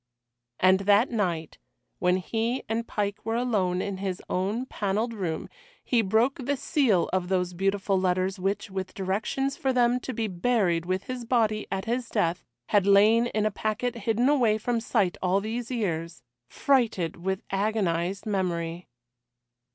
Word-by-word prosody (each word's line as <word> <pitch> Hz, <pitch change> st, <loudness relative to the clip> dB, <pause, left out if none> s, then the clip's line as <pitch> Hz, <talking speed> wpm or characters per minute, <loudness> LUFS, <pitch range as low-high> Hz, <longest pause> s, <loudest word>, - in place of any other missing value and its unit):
And 185 Hz, +1 st, +5 dB
that 205 Hz, +5 st, +3 dB
night, 175 Hz, -8 st, -2 dB, 0.4 s
when 180 Hz, 0 st, +3 dB
he 225 Hz, +6 st, -2 dB
and 230 Hz, +1 st, -2 dB
Pike 205 Hz, -1 st, -2 dB
were 225 Hz, +1 st, -1 dB
alone 200 Hz, -7 st, 0 dB
in 200 Hz, -2 st, -4 dB
his 190 Hz, -1 st, -3 dB
own 205 Hz, +7 st, -1 dB
panelled 215 Hz, 0 st, -1 dB
room, 180 Hz, -7 st, -3 dB, 0.4 s
he 240 Hz, -2 st, +2 dB
broke 225 Hz, +6 st, +2 dB
the 280 Hz, +3 st, 0 dB
seal 255 Hz, -, +2 dB
of 185 Hz, -1 st, 0 dB
those 180 Hz, -1 st, 0 dB
beautiful 195 Hz, +1 st, 0 dB
letters 185 Hz, +1 st, 0 dB
which, 195 Hz, +1 st, -2 dB
with 190 Hz, -1 st, -5 dB
directions 210 Hz, +8 st, -1 dB
for 275 Hz, -6 st, 0 dB
them 245 Hz, -1 st, +3 dB
to 260 Hz, -, -5 dB
be 225 Hz, -3 st, -2 dB
buried 180 Hz, -4 st, +1 dB
with 185 Hz, +1 st, -1 dB
his 255 Hz, -1 st, -5 dB
body 220 Hz, -3 st, +1 dB
at 190 Hz, +1 st, -2 dB
his 240 Hz, +1 st, -2 dB
death, 175 Hz, -5 st, 0 dB, 0.3 s
had 200 Hz, -2 st, +3 dB
lain 215 Hz, +4 st, +5 dB
in 215 Hz, -2 st, -1 dB
a 215 Hz, -, +1 dB
packet 215 Hz, +4 st, -2 dB
hidden 230 Hz, +2 st, 0 dB
away 245 Hz, -7 st, +3 dB
from 235 Hz, +2 st, -1 dB
sight 190 Hz, -5 st, +1 dB
all 185 Hz, +1 st, +2 dB
these 225 Hz, +3 st, -4 dB
years, 170 Hz, -, -3 dB, 0.2 s
freighted 220 Hz, -, +1 dB
with 190 Hz, +2 st, -3 dB
agonised 195 Hz, -2 st, 0 dB
memory. 175 Hz, -4 st, -2 dB
205 Hz, 160 wpm, -27 LUFS, 185-230 Hz, 0.4 s, And